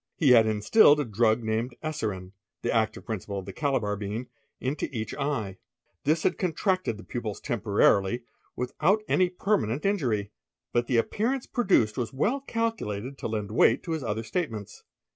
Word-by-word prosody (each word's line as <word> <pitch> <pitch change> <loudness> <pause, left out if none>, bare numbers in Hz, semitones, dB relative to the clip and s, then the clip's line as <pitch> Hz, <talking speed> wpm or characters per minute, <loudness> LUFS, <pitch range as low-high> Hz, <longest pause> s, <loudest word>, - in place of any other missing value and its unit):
He 145 -6 +4
had 115 -3 +7
instilled 125 - +5
a 145 - 0
dru, 110 0 +3
named 115 +1 -2
eserine, 105 -12 -3 0.3
the - - 0
active 110 -1 0
principle 100 -2 -4
of 95 - -5
the 95 - -7
Calabar 120 -6 0
bean, 105 +4 -5 0.3
into 135 +3 -2
each 110 -4 -4
ey 120 -10 -2 0.5
This 155 +2 +2
had - - +1
contracted 185 - 0
the 110 - -11
pupils 110 -4 -5
temporarily, 105 +1 +2 0.3
without 160 - +1
any 185 -1 +3
permane 180 - 0
injury, 120 - 0 0.4
but 120 0 +1
the 125 - +2
appearance 235 - 0
produced 160 - +2
was 120 - -2
well 215 - +1
calculated 140 - -3
to - - -3
lend 105 -2 -3
weig 115 +3 +4
to 170 - -5
his 160 -3 -2
other 110 -1 -2
statements." 110 - -4
120 Hz, 160 wpm, -27 LUFS, 105-155 Hz, 0.5 s, had